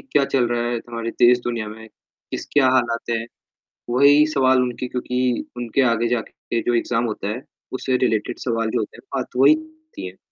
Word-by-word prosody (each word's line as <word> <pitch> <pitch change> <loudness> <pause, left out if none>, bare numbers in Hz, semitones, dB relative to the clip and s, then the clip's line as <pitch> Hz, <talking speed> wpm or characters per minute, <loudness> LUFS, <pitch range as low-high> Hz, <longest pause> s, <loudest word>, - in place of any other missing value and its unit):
क्या 145 - +4
चल 135 -3 +1
रहा 120 0 0
है 120 - -1
हमारे 115 -1 -4
देश-दुनिया 120 -2 +2
में, 110 +1 -10 0.4
किस - - -5
क्या 140 -3 +5
हालात 120 -2 0
हैं। 115 -1 -1 0.6
वही 140 +4 +6
सवाल 130 -2 +4
उनके 125 0 -3
क्योंकि 125 0 -1
उनके 120 +2 0
आगे 115 +1 0
जाके 115 0 -3
जो 120 - 0
एग्ज़ाम 115 0 +1
होता 105 -3 -3
है 115 +5 -4 0.3
उससे 130 0 0
रिलेटेड 120 -2 0
सवाल 115 -2 -1
जो 120 - 0
होते 110 - -4
हैं - - -15
बात - - -4
वही - - +7
होती 315 - -9
है। 90 +1 -10
120 Hz, 185 wpm, -22 LUFS, 115-130 Hz, 0.6 s, वही